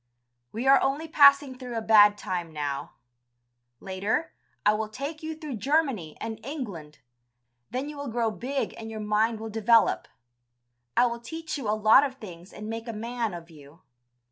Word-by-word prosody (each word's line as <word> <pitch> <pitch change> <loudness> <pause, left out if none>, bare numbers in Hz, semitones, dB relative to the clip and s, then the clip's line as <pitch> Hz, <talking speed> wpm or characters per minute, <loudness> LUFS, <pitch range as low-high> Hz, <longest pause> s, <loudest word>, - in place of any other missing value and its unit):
We 230 +4 -4
are 270 +1 +6
only 280 +4 -1
passing 280 -3 +6
through 250 -3 -5
a - - -1
bad 210 -1 +6
time 175 -4 -4
now; 145 -2 -4 0.9
later, 200 +12 -2 0.3
I 210 - +5
will 215 0 -2
take 280 +7 -6
you 315 0 -5
through 305 -6 -6
Germany 260 - 0
and 220 -1 -6
England, 200 - -7 0.7
then 260 +3 -3
you 300 0 -8
will 285 0 -5
grow 230 -1 0
big 265 +5 -3
and 225 0 -7
your 220 -1 -6
mind 215 +1 +1
will 220 0 -6
develop. 225 +1 +3 0.9
I - - +6
will 235 -1 -2
teach 320 +7 -6
you 265 -8 -3
a 215 - +1
lot 215 +5 +6
of 270 -2 -3
things 180 -6 -11
and 210 0 -8
make 225 +1 -5
a 230 - -4
man 230 -2 -3
of 170 0 -10
you. 150 +2 -16
225 Hz, 175 wpm, -27 LUFS, 210-270 Hz, 0.9 s, are